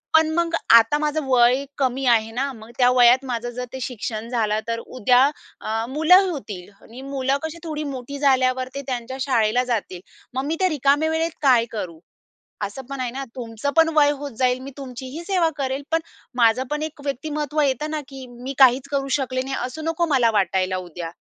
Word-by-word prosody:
पण 320 Hz, 0 st, +5 dB
मग 340 Hz, -1 st, +1 dB, 0.2 s
आता 230 Hz, +5 st, +7 dB
माझं 300 Hz, 0 st, -1 dB
वय 250 Hz, +1 st, +4 dB
कमी 265 Hz, 0 st, 0 dB
आहे 225 Hz, -2 st, +3 dB
ना, 270 Hz, +4 st, -2 dB
मग 220 Hz, -1 st, -13 dB
त्या 245 Hz, -1 st, +5 dB
वयात 250 Hz, +1 st, +5 dB
माझं 240 Hz, -1 st, -3 dB
जर 250 Hz, +1 st, -5 dB
ते 265 Hz, -, -5 dB
शिक्षण 230 Hz, -2 st, -5 dB
झालं 215 Hz, -3 st, 0 dB
तर 230 Hz, 0 st, -2 dB
उद्या 250 Hz, +1 st, +2 dB, 0.4 s
अ, 225 Hz, +1 st, -2 dB
मुलं 355 Hz, +7 st, +5 dB
होतील 205 Hz, -, -7 dB
आणि 240 Hz, +3 st, -12 dB
मुलं 270 Hz, 0 st, -1 dB
कशी 320 Hz, +1 st, -5 dB
थोडी 305 Hz, -2 st, -4 dB
मोठी 265 Hz, +2 st, -6 dB
झाल्यावर 260 Hz, -2 st, +2 dB
ते 280 Hz, -, -3 dB
त्यांच्या 255 Hz, 0 st, -4 dB
शाळेला 245 Hz, -2 st, +2 dB
जातील 215 Hz, -7 st, -3 dB, 0.3 s
मग 265 Hz, +1 st, -2 dB
मी 310 Hz, +3 st, -1 dB
त्या 375 Hz, -1 st, +3 dB
रिकामे 290 Hz, 0 st, +2 dB
वेळेत 325 Hz, +1 st, 0 dB
काय 255 Hz, -5 st, +4 dB
करू? 180 Hz, -7 st, -6 dB, 0.6 s
असं 205 Hz, +6 st, -4 dB
पण 275 Hz, -1 st, -5 dB
आहे 250 Hz, -2 st, -2 dB
ना? 270 Hz, +2 st, -5 dB
तुमचं 235 Hz, +2 st, -4 dB
पण 325 Hz, 0 st, +6 dB
वय 290 Hz, -1 st, +6 dB
होत 285 Hz, 0 st, -6 dB
जाईल 255 Hz, -1 st, +2 dB
मी 275 Hz, +1 st, -8 dB
तुमचीही 260 Hz, +3 st, -7 dB
सेवा 365 Hz, -3 st, +2 dB
करेल, 270 Hz, 0 st, -2 dB
पण 325 Hz, 0 st, +2 dB, 0.3 s
माझं 240 Hz, +1 st, +3 dB
पण 300 Hz, 0 st, -1 dB
एक 310 Hz, -2 st, -7 dB
व्यक्तिमत्त्व 295 Hz, +2 st, -2 dB
येतं 290 Hz, +2 st, 0 dB
ना 310 Hz, -1 st, -2 dB
की 270 Hz, -2 st, -9 dB
मी 245 Hz, +3 st, -7 dB
काहीच 265 Hz, +1 st, +5 dB
करू 275 Hz, -1 st, -1 dB
शकले 255 Hz, -1 st, -2 dB
नाही, 270 Hz, +1 st, -4 dB
असू 255 Hz, +5 st, -7 dB
नको 325 Hz, +1 st, 0 dB
मला 235 Hz, -3 st, +4 dB
वाटायला 190 Hz, -2 st, +1 dB
उद्या." 175 Hz, -2 st, -7 dB
260 Hz, 195 wpm, -22 LUFS, 235-290 Hz, 0.6 s, आता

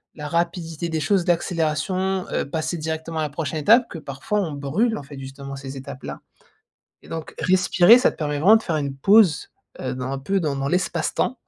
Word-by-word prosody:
la 150 Hz, -1 st, -6 dB
rapidité 170 Hz, 0 st, -2 dB
des 160 Hz, -1 st, -1 dB
choses, 175 Hz, +4 st, +1 dB
d'accélération, 175 Hz, +2 st, 0 dB
heu, -, -, -1 dB
passer 160 Hz, +2 st, -2 dB
directement 160 Hz, +1 st, -4 dB
à -, -, 0 dB
la 150 Hz, -, -2 dB
prochaine 155 Hz, +1 st, -3 dB
étape 230 Hz, -, +5 dB
que -, -, -7 dB
parfois, 145 Hz, +7 st, -3 dB
on 170 Hz, -5 st, -3 dB
brûle, 155 Hz, -, 0 dB
en -, -, -6 dB
fait, 140 Hz, 0 st, -10 dB
justement, 135 Hz, +1 st, -8 dB
ces 135 Hz, 0 st, -8 dB
étapes-là. 135 Hz, 0 st, -8 dB, 0.8 s
Et -, -, -17 dB
donc 160 Hz, -1 st, -6 dB
respirer, 185 Hz, +4 st, +5 dB
ça 255 Hz, -, +3 dB
te -, -, -17 dB
permet 150 Hz, -2 st, -2 dB
vraiment 200 Hz, +9 st, +7 dB
de 220 Hz, -, -1 dB
faire 165 Hz, -, -1 dB
une 140 Hz, -2 st, -2 dB
pause, 195 Hz, -1 st, +4 dB, 0.3 s
heu, 130 Hz, 0 st, -3 dB
dans 130 Hz, 0 st, -4 dB
un 135 Hz, -, -2 dB
peu 195 Hz, +8 st, -1 dB
dans 150 Hz, -5 st, -1 dB
dans 135 Hz, 0 st, -2 dB
l'espace-temps, 180 Hz, -, -1 dB
160 Hz, 205 wpm, -23 LUFS, 140-185 Hz, 0.8 s, vraiment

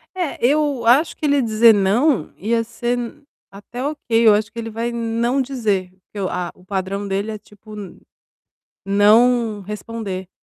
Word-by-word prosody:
É, 355 Hz, -5 st, -3 dB
eu 285 Hz, -2 st, +1 dB
acho 265 Hz, +8 st, +4 dB
que -, -, -4 dB
ele 285 Hz, -2 st, +3 dB
dizer 225 Hz, 0 st, +5 dB
"não", 205 Hz, -, +1 dB
ia 230 Hz, +4 st, 0 dB
ser 240 Hz, +1 st, -3 dB, 0.5 s
até 225 Hz, +5 st, -8 dB
ok. 295 Hz, +2 st, -2 dB, 0.3 s
Eu 215 Hz, -, +8 dB
acho 205 Hz, 0 st, 0 dB
que 230 Hz, -, -8 dB
ele 225 Hz, 0 st, -5 dB
vai 230 Hz, +2 st, -3 dB
não 235 Hz, +3 st, 0 dB
dizer, 220 Hz, -9 st, -1 dB
porque 190 Hz, +2 st, -13 dB
o 190 Hz, -, -1 dB
a 180 Hz, -1 st, -3 dB
o 180 Hz, -, -22 dB
padrão 195 Hz, +1 st, -3 dB
dele 200 Hz, +2 st, -2 dB
é 215 Hz, -, -5 dB
tipo, 210 Hz, +1 st, -15 dB
n 205 Hz, -3 st, -9 dB, 0.9 s
não 215 Hz, +2 st, +4 dB
responder. 205 Hz, -2 st, -6 dB
220 Hz, 165 wpm, -20 LUFS, 200-240 Hz, 0.9 s, Eu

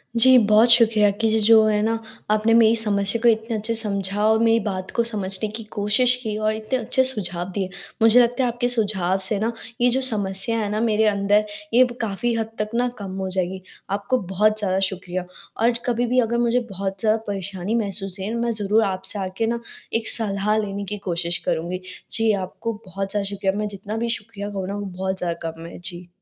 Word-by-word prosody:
जी, 255 Hz, +2 st, +7 dB
बहुत 215 Hz, +1 st, +5 dB
शुक्रिया 220 Hz, -3 st, +5 dB
कि 225 Hz, +2 st, 0 dB
ज 220 Hz, 0 st, +2 dB
जो 220 Hz, 0 st, +7 dB
है 210 Hz, -1 st, +2 dB
ना, 225 Hz, +1 st, +1 dB, 0.3 s
आपने 215 Hz, +1 st, +3 dB
मेरी 230 Hz, -1 st, +6 dB
समस्या 205 Hz, -1 st, +1 dB
को 240 Hz, -, +3 dB
इतने 225 Hz, +1 st, 0 dB
अच्छे 220 Hz, +2 st, -1 dB
से 225 Hz, -, +4 dB
समझा 200 Hz, -1 st, -1 dB
और 220 Hz, 0 st, +4 dB
मेरी 230 Hz, 0 st, +4 dB
बात 185 Hz, -2 st, -4 dB
को 235 Hz, -, +3 dB
समझने 210 Hz, -2 st, -3 dB
की 225 Hz, -, -6 dB
कोशिश 210 Hz, +5 st, +3 dB
की 215 Hz, -1 st, -3 dB
और 215 Hz, 0 st, +1 dB
इतने 220 Hz, +4 st, -2 dB
अच्छे 255 Hz, +3 st, +1 dB
सुझाव 185 Hz, -8 st, -2 dB
दिए। 190 Hz, -1 st, -2 dB, 0.3 s
मुझे 225 Hz, +2 st, +7 dB
लगता 245 Hz, +2 st, +1 dB
है 250 Hz, -, +2 dB
आपके 245 Hz, +1 st, 0 dB
सुझाव 200 Hz, -6 st, 0 dB
से 200 Hz, +1 st, 0 dB
ना, 225 Hz, +3 st, 0 dB, 0.3 s
ये 245 Hz, -, +5 dB
जो 260 Hz, +2 st, +1 dB
समस्या 215 Hz, -2 st, -1 dB
है 210 Hz, -, -1 dB
ना 215 Hz, -, -1 dB
मेरे 220 Hz, -1 st, +2 dB
अंदर 205 Hz, +1 st, +2 dB, 0.3 s
ये 250 Hz, +2 st, +7 dB
ब 240 Hz, -1 st, -3 dB
काफ़ी 225 Hz, +2 st, -1 dB
हद 225 Hz, -1 st, -2 dB
तक 210 Hz, -, -1 dB
ना 245 Hz, +1 st, +2 dB
कम 195 Hz, -2 st, -6 dB
हो 190 Hz, -1 st, -3 dB
जाएगी, 185 Hz, 0 st, -2 dB, 0.3 s
आपको 200 Hz, +6 st, 0 dB
बहुत 215 Hz, +3 st, +2 dB
ज़्यादा 190 Hz, -2 st, 0 dB
शुक्रिया। 185 Hz, -1 st, -4 dB, 0.4 s
और 235 Hz, +1 st, +5 dB
ज 235 Hz, -, -3 dB
कभी 245 Hz, 0 st, +1 dB
भी 250 Hz, +2 st, +2 dB
अगर 235 Hz, +1 st, 0 dB
मुझे 240 Hz, +1 st, +2 dB
बहुत 195 Hz, 0 st, -4 dB
ज़्यादा 215 Hz, +1 st, +2 dB
परेशानी 195 Hz, +1 st, -3 dB
महसूस 195 Hz, -3 st, -3 dB
है, 200 Hz, +4 st, -3 dB
मैं 235 Hz, 0 st, 0 dB
ज़रूर 215 Hz, 0 st, +2 dB
आपसे 190 Hz, +1 st, -3 dB
आके 190 Hz, +3 st, -2 dB
ना 235 Hz, 0 st, -1 dB, 0.3 s
एक 225 Hz, 0 st, 0 dB
सलाह 210 Hz, -1 st, +1 dB
लेने 200 Hz, -1 st, -3 dB
की 210 Hz, -, -4 dB
कोशिश 175 Hz, -1 st, -1 dB
करूँगी, 170 Hz, +3 st, -2 dB, 0.3 s
जी 225 Hz, -1 st, +3 dB
आपको 200 Hz, +4 st, -3 dB
बहुत 195 Hz, +1 st, -4 dB
ज़्यादा 205 Hz, -1 st, -1 dB
शुक्रिया, 195 Hz, -1 st, -1 dB
मैं 210 Hz, 0 st, -1 dB
जितना 205 Hz, +2 st, -6 dB
भी 235 Hz, +1 st, -1 dB
शुक्रिया 205 Hz, -2 st, -4 dB
कहूँ 195 Hz, -2 st, -4 dB
ना 200 Hz, -, -4 dB
वो 205 Hz, 0 st, -4 dB
बहुत 190 Hz, 0 st, -3 dB
ज़्यादा 170 Hz, -2 st, -3 dB
कम 165 Hz, +1 st, -11 dB
है। 170 Hz, -, -9 dB
जी। 175 Hz, 0 st, -6 dB
210 Hz, 215 wpm, -22 LUFS, 195-225 Hz, 0.4 s, जी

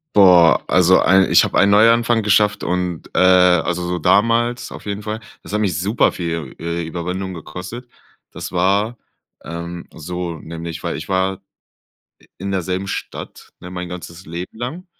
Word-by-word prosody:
Boah, 90 Hz, -5 st, +6 dB
also 90 Hz, +1 st, +5 dB
ein 95 Hz, 0 st, +4 dB
ich -, -, +7 dB
habe -, -, 0 dB
ein 100 Hz, -, +5 dB
Neuanfang 115 Hz, +2 st, +4 dB
geschafft 105 Hz, 0 st, +2 dB
und, 90 Hz, -2 st, -2 dB
äh -, -, +1 dB
also 90 Hz, -1 st, +4 dB
so 90 Hz, 0 st, -2 dB
damals 115 Hz, +7 st, +2 dB
auf -, -, -10 dB
jeden 100 Hz, +1 st, -4 dB
Fall, 110 Hz, +1 st, -4 dB, 0.2 s
das -, -, -10 dB
hat 105 Hz, -, +1 dB
mich 90 Hz, -5 st, 0 dB
superviel, 85 Hz, -, -1 dB
äh, 85 Hz, +1 st, -3 dB
Überwindung 90 Hz, +3 st, -4 dB
gekostet. 90 Hz, +10 st, -8 dB, 0.4 s
Das -, -, -7 dB
war, 100 Hz, +6 st, +1 dB, 0.5 s
ähm, 85 Hz, +1 st, -7 dB
so 85 Hz, 0 st, -5 dB
nämlich 85 Hz, +1 st, -7 dB
weil -, -, -3 dB
ich 80 Hz, -, -8 dB
war 95 Hz, 0 st, 0 dB, 0.8 s
i -, -, -24 dB
in 100 Hz, +2 st, -4 dB
derselben 95 Hz, 0 st, -2 dB
Stadt, -, -, -7 dB
ne, 90 Hz, -, -9 dB
mein 90 Hz, -1 st, -6 dB
ganzes 90 Hz, 0 st, -9 dB
Leben 85 Hz, +4 st, -7 dB
lang. 145 Hz, -, -6 dB
90 Hz, 160 wpm, -19 LUFS, 85-100 Hz, 0.8 s, ich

